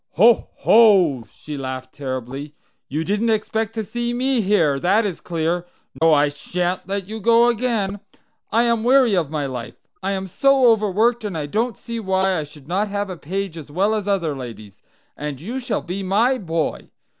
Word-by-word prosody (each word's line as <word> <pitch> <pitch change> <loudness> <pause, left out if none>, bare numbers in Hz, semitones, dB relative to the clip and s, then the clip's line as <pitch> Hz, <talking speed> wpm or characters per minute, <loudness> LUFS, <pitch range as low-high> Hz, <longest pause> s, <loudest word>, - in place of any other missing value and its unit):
"Ho, 225 +7 +4
ho!" 190 - +5
she 150 - -8
laughed 130 -1 -6
terribly. 135 +2 -5 0.3
"You 155 +4 -2
didn't 210 +6 0
expect 220 0 -1
to 220 - -2
see 240 +3 -3
me 255 0 +1
here, 170 -9 +2
that 205 +8 +2
is 190 -5 -4
clear! 170 +1 -2 0.3
No, 165 0 +5
I 150 -1 +5
shan't 180 +6 -3
let 195 -1 -3
you 220 +1 -6
go 235 +3 +5
again. 220 -4 -1 0.5
I 230 +2 +3
am 235 -2 +1
weary 250 -3 +4
of 165 -6 0
my 150 -2 -2
life. 125 -3 -6 0.3
I 195 +1 -1
am 190 0 -3
so 270 +7 +3
overworked, 220 +2 +1
and 200 -6 -3
I 150 - -2
don't 220 +8 -1
see 230 -1 -6
why 190 -3 +1
I 150 - -4
should 145 -1 -16
not 195 +5 0
have 205 -1 -3
a - - -5
page 185 +1 -4
as 150 - -11
well 195 +8 +1
as 210 -2 -2
other 170 -7 0
ladies. 115 -6 -9 0.3
And 145 -3 -5
you 230 - -5
shall 250 - -2
be 185 +3 -4
my 225 +7 +2
boy. 165 -4 -3
190 Hz, 190 wpm, -21 LUFS, 155-220 Hz, 0.5 s, ho